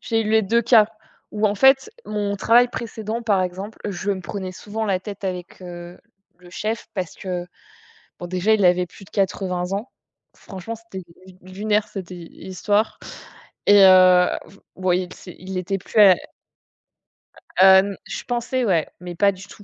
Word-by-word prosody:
j'ai 225 -1 -1
eu 215 - -3
les 220 0 +4
2 230 +4 +2
cas 225 -2 +5 0.4
où 215 0 0
en 205 - 0
fait, 270 - +4 0.2
mon 205 -1 -2
travail 240 +5 +4
précédent, 225 -1 -5
par 200 -4 +2
exemple, 190 +4 -6
je 195 +1 -3
me 190 -2 -2
prenais 185 0 -6
souvent 215 +4 -5
la 195 -3 0
tête 200 +1 -9
avec, 180 -2 -5
heu, 175 0 -9 0.4
le 180 -1 -16
chef 215 +4 -4
parce 185 -4 -4
que, 180 -2 -5 0.7
bon, 175 - -6
déjà, 185 +4 +1
il 205 -3 +1
avait 180 0 +3
plus 195 - -15
de - - -20
80 185 -2 -2
ans. 205 +6 -4 0.4
Franchement, 195 +5 -8
c'était 220 -5 -10 0.2
l 185 - -15
lunaire, 205 +3 -1
cette, 185 -3 -8
heu, - - -7
histoire 190 +5 -2 0.7
et 205 -1 +7
heu, 185 -1 +7 0.5
ouais, 185 0 0
l 180 - -10
c'est 180 - -12
il 185 +1 -6
était 190 +2 -2
plus, 205 - -2
heu 195 -3 +9 1.5
heu, - - +9 0.3
n - - -13
je - - -6
pensais, 245 +1 -2
ouais, 170 -7 +1
mais 175 0 -8
pas 200 +3 +3
du 190 +1 -12
tout, 205 - -15
195 Hz, 175 wpm, -22 LUFS, 180-215 Hz, 1.5 s, heu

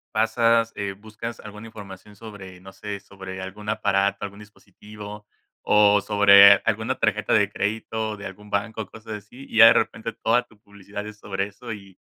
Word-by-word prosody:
pasas, 115 +1 +2
eh, 100 -1 -4
buscas 110 +3 -9
alguna 105 +1 -10
información 105 -1 -12
sobre, 100 -4 -11
no 95 +1 -13
sé, 100 +1 -7
sobre 95 -1 -9
algún 105 +3 -8
aparato, 100 -1 0
algún 100 0 -7
dispositivo 105 0 -12 0.3
o 105 -1 +4
sobre 100 -1 +7
alguna 110 0 -1
tarjeta - - 0
de - - +3
crédito 110 +1 -3
de 100 - -10
algún 105 +2 -10
banco, 110 +2 -3
cosas 110 0 -10
así, 125 +6 -14
y - - -5
ya 115 - +10
de 115 - +9
repente 115 0 -1
toda 120 +3 +1
tu 115 - -23
publicidad 100 0 -9
es 105 0 -10
sobre 95 -1 -3
eso. 115 +3 -9
Y, 100 -3 -13
105 Hz, 175 wpm, -23 LUFS, 100-110 Hz, 0.3 s, ya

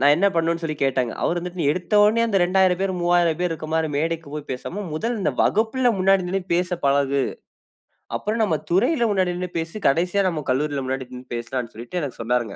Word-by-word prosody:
நான் 145 +2 +6
என்ன 195 - +3
பண்ணனும்ன்னு 165 0 0
சொல்லி 155 -1 -2
கேட்டேங்க. 130 -3 +1
அவர் 175 - +1
வந்துட்டு 180 0 -5
"நீ 145 - +1
எடுத்த 180 +4 -3
உடனே 220 +3 +4
அந்த 205 -4 +2
2000 185 0 +3
பேர் 195 -1 0
3000 175 -2 +2
பேர் 180 -1 +1
இருக்க 155 -1 -6
மாரி 160 -1 +1
மேடைக்கு 165 0 -2
போய் 150 -1 -6
பேசாம 185 +10 -5
முதல் 230 +8 -2
இந்த 150 -6 0
வகுப்பில 235 +4 +2
முன்னாடி 190 0 +3
நின்னு 190 0 -1
பேச 180 +1 0 0.2
பழகு. 140 0 +2 1.0
அப்பறம் 220 +2 -1
நம்ம 165 -7 +1
துறையில 240 - +3
முன்னாடி 185 -3 +1
நின்னு 180 -1 -4
பேசு. 165 +3 -5
கடைசியா 180 +7 +2
நம்ம 155 -4 -4
கல்லூரியில 140 +1 -1
முன்னாடி 130 -1 -3
நின்னு 125 0 -10
பேசலாம்ன்னு" 120 0 -4
சொல்லிட்டு 120 +11 -5
எனக்கு 130 -4 -5
சொன்னாருங்க. 120 -3 -1
170 Hz, 200 wpm, -23 LUFS, 140-190 Hz, 1.0 s, நான்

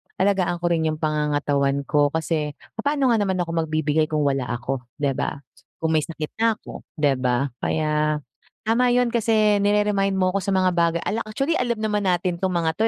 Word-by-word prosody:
alagaan 190 -2 +1
ko 175 - +2
rin 165 -1 +1
iyung 155 - 0
pangangatawan 145 -2 0
ko. 145 +1 +2
Kasi 155 -1 -2 0.3
papaano 280 0 +2
nga 230 - +4
naman 195 -2 0
ako 175 -2 -2
magbibigay 155 0 +1
kung 155 -1 -1
wala 135 -3 +1
ako 120 +3 -3 0.2
hindi 140 - +2
ba? 140 - -3 0.4
Kung 160 - 0
maysakit 155 -1 -1
na 225 0 +3
ako - - -11 0.2
hindi 145 -2 +4
ba? 125 +2 +1
Kaya 150 -1 0 0.4
tama 240 +3 +3
iyun 245 -1 +2
kasi 215 -3 +3
nire-remind 205 -1 +2
mo 185 -1 +2
ako 200 - +1
sa 200 - -3
mga 185 -1 +3
baga 170 -1 +2
ala 225 +2 -1
actually 275 +9 0
alam 240 -6 0
naman 215 -1 0
natin 175 -1 0
itong 190 - +1
mga 165 -1 +1
ito, 190 - -6
170 Hz, 190 wpm, -23 LUFS, 150-210 Hz, 0.4 s, nga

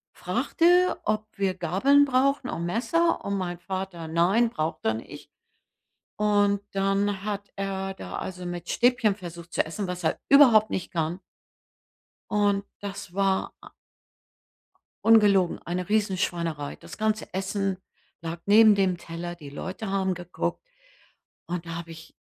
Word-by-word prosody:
fragte, 355 +2 +2
ob 215 0 -1
wir 190 -2 0
Gabeln 225 - +4
brauchen 270 0 +1
und 170 - -3
Messer, 330 - +1
und 200 0 -1
mein 175 -2 -3
Vater: 185 -3 -5
„Nein.“ 185 +9 +3
Braucht 160 -5 -3
er 110 - +3
nicht. 110 - -9 0.9
Und 205 -1 +2
dann 195 0 0
hat 205 -1 -4
er 195 -1 -3
da, - - -7
also, 180 -1 -6
mit 175 -1 -6
Stäbchen 240 -4 +3
versucht 170 -3 -10
zu - - +1
essen, 185 +4 -4
was 180 -1 -5
er 160 - 0
überhaupt 245 -7 +7
nicht 185 - -4
kann. 165 +1 -2 1.1
Und 205 -1 +1
das 200 -2 -7
war 195 -1 0
a - - -12 1.3
ungelogen, 205 -5 +5
eine 180 +2 -3
Riesenschweinerei. 175 -8 -1
Das - - -12
ganze 215 0 -1
Essen 195 0 -2 0.4
lag 165 0 -5
neben 215 +1 +7
dem 185 -3 +1
Teller, 175 +1 -6
die 145 -4 -11
Leute 185 +8 -6
haben 190 -1 0
geguckt. 175 - -4 0.8
Und 175 -1 -4
da 165 - -5
habe 170 -1 -7
ich 165 0 -13
195 Hz, 140 wpm, -26 LUFS, 175-210 Hz, 1.3 s, überhaupt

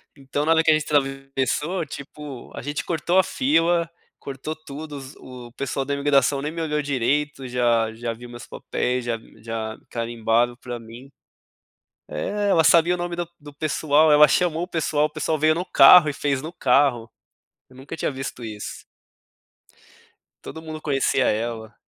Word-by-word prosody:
Então, 140 +1 -3
na 160 - +2
hora 165 0 +4
que - - +2
a - - +7
gente 155 0 +1
atravessou, 135 +4 -1
tipo, 140 -2 -9
a - - -6
gente 145 +4 -4
cortou 170 +2 0
a 190 - +6
fila, 165 +1 +1 0.3
cortou 140 +3 -6
tudo, 150 -1 -9
os 135 0 -10
o 125 -2 -11
pessoal 140 +1 -3
da 140 - -2
imigração 140 -1 +2
nem 150 +2 -3
me 165 +1 -5
olhou 150 -2 -1
direito, 140 +1 -1
já 120 -2 +1
já 115 0 -4
viu 120 +2 -11
meus 120 0 -10
papéis, 125 0 -3
já 120 -1 -1 0.2
já 110 -1 -4
carimbaram 115 0 0
para 120 0 -7
mim 115 +4 -12 1.0
É, 205 0 -2
ela 165 -4 +4
sabia 170 +2 +5
o - - -7
nome 175 0 -3
do 175 0 -3
do 145 -1 -12
pessoal, 155 +1 +2
ela 150 0 +8
chamou 170 +1 +1
o - - -5
pessoal, 155 -4 0
o 155 - -2
pessoal 155 +1 -1
veio 155 +1 +3
no 170 +3 -2
carro 180 -3 +8
e - - -3
fez 140 -2 -1
no 155 +3 -6
carro. 130 -7 +2 0.6
Eu 130 - -20
nunca 135 +5 -8
tinha - - -1
visto 130 -2 -6
isso. 105 -2 -7 1.6
Todo 160 - -8
mundo 155 -1 -8
conhecia 135 -2 +1
ela 110 0 -2
140 Hz, 175 wpm, -23 LUFS, 125-155 Hz, 1.6 s, ela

